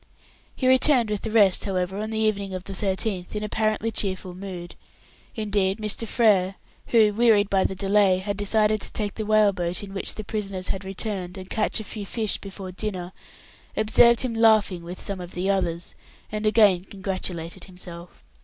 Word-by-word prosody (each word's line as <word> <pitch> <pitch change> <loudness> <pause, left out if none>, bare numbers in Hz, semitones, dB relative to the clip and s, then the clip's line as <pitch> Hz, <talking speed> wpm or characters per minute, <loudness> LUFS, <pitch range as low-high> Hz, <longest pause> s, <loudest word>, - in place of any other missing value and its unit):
He 255 - 0
returned 255 -3 +4
with 210 - -2
the 225 - -4
rest, 205 -4 +4
however, 190 0 -2
on 215 +1 -3
the 220 - -3
evening 200 -3 0
of 185 - -5
the 195 - -8
13th, 190 0 -2
in 210 - -2
apparently 215 +1 0
cheerful 185 -3 -2
mood. 180 -2 -7 0.6
Indeed 205 -3 0
Mr. 215 +1 -3
Frere, 195 -5 +3 0.3
who, 220 -3 +4
wearied 215 -2 +4
by 190 -1 +3
the 190 - -1
delay, 195 -1 +3
had 200 +2 -3
decided 210 +1 +1
to - - -7
take 205 -2 -2
the 215 -2 -5
whale 215 -2 +4
boat 175 0 -3
in 195 -1 -8
which 195 - -2
the 215 - -6
prisoners 195 -3 -4
had 195 0 -2
returned, 190 -1 -4
and 185 0 -9
catch 215 +1 0
a - - -5
few 205 -1 -7
fish 220 -1 0
before 195 -1 -8
dinner, 185 -2 -5 0.6
observed 230 +2 +5
him 255 -3 -2
laughing 220 -5 +4
with 175 +2 -8
some 195 -2 -4
of 175 0 -9
the 185 +2 +1
others, 175 -3 -2 0.4
and 215 0 -1
again 205 -5 +5
congratulated 185 -4 -5
himself. 180 -2 -11
200 Hz, 180 wpm, -25 LUFS, 185-215 Hz, 0.6 s, observed